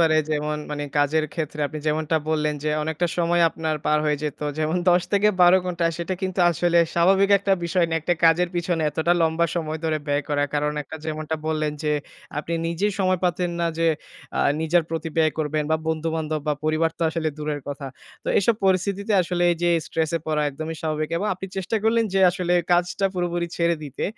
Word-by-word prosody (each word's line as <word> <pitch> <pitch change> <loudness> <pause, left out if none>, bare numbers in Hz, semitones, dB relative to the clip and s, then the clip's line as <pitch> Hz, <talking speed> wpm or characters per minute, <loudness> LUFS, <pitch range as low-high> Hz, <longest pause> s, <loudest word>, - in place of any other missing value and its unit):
পারে 160 -1 +4
যেমন 150 0 -1
মানি 145 0 -3
কাজের 155 +2 +2
ক্ষেত্রে 155 -2 -4
আপনি 155 +2 -6
যেমনটা 155 +1 +1
বললেন 150 -1 +1
যে 155 - +1
অনেকটা 160 +3 -1
সময় 170 0 +3
আপনার 160 -1 -2
পার 150 0 +3
হয়ে 150 -1 +1
যেত। 150 -1 -4 0.2
যেমন 155 +3 0
১০-১২ 185 0 +4
ঘন্টা 175 -2 -2
সেটা 170 +2 -2
কিন্তু 185 -1 -1
আসলে 170 0 +2 0.2
স্বাভাবিক 195 +3 +4
একটা 200 0 0
বিষয় 170 +1 +2
না। 165 - 0
একটা 175 +3 +1
কাজের 170 +2 +4
পিছনে 170 -1 0
এতটা 160 +3 +1
লম্বা 160 +1 +2
সময় 160 -1 -2
ধরে 155 -1 +1
ব্যয় 145 0 +1
করা। 145 -1 +1
কারণ 150 0 +1
একটা 160 - -9
যেমনটা 155 0 -3
বললেন 155 -1 0
যে 150 0 +1 0.5
আপনি 165 +2 -3
নিজেই 190 +5 0
সময় 185 -1 +2
পেতেন 180 0 0
না 170 - +2
যে 165 - +2 0.5
আ - - +3 0.2
নিজের 165 +1 +3
প্রতি 165 0 -3
ব্যয় 155 -1 +3
করবেন 155 0 0
বা 160 - +4
বন্ধু-বান্ধব 160 -1 -1
বা 150 - +2
পরিবার 155 +1 +2
তো - - -2
আসলে 160 -1 -1
দূরের 150 -1 -3
কথা। 145 0 -5 0.4
তো - - -3
এইসব 220 +3 +3
পরিস্থিতিতে 200 +3 +1
আসলে 175 0 -2
এই 170 - 0
যে 175 - +3 0.2
স্ট্রেস 160 -2 -1
এ - - -1
পড়া 155 -1 +1
একদমই 155 +3 -6
স্বাভাবিক। 155 -1 -1
এবং 205 +5 -1
আপনি 190 +1 -7
চেষ্টা 190 +4 -1
করলেন 225 +1 +3
যে 195 - +3
আসলে 180 -1 -2 0.2
কাজটা 180 +3 +2
পুরোপুরি 175 -1 -1
ছেড়ে 170 -1 +2
দিতে। 140 - -5
165 Hz, 195 wpm, -23 LUFS, 155-175 Hz, 0.5 s, পারে